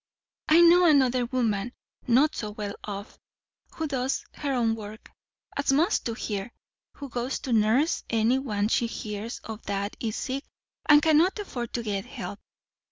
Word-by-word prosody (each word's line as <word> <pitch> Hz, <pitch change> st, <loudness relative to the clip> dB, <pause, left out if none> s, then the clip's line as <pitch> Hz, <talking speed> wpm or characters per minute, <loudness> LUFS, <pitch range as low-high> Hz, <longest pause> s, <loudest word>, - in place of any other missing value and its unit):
"I 320 Hz, +2 st, +7 dB
know 345 Hz, +1 st, +7 dB
another 255 Hz, -5 st, +4 dB
woman, 235 Hz, -2 st, -1 dB, 0.3 s
not 265 Hz, +6 st, +4 dB
so 210 Hz, -, -4 dB
well 205 Hz, -1 st, -5 dB
off, 200 Hz, 0 st, -7 dB, 0.6 s
who 320 Hz, -, -2 dB
does 265 Hz, -2 st, -2 dB
her 285 Hz, -2 st, -3 dB
own 235 Hz, -4 st, +2 dB
work, 215 Hz, 0 st, -9 dB, 0.4 s
as 280 Hz, -1 st, +1 dB
most 325 Hz, +9 st, +2 dB
do 230 Hz, -, -2 dB
here; 205 Hz, -1 st, -4 dB, 0.4 s
who 285 Hz, -, -8 dB
goes 245 Hz, +1 st, -3 dB
to 255 Hz, -, -2 dB
nurse 230 Hz, +9 st, +2 dB
any 230 Hz, +3 st, +2 dB
one 210 Hz, -6 st, -1 dB
she 235 Hz, +1 st, +1 dB
hears 215 Hz, 0 st, -5 dB
of 220 Hz, 0 st, -7 dB
that 200 Hz, +1 st, -2 dB
is 220 Hz, -2 st, -3 dB
sick 270 Hz, +2 st, -3 dB, 0.5 s
and 295 Hz, 0 st, +7 dB
cannot 320 Hz, +5 st, +4 dB
afford 250 Hz, -, -5 dB
to 240 Hz, -, -2 dB
get 200 Hz, -3 st, -2 dB
help. -, -, -7 dB
240 Hz, 165 wpm, -27 LUFS, 215-280 Hz, 0.6 s, I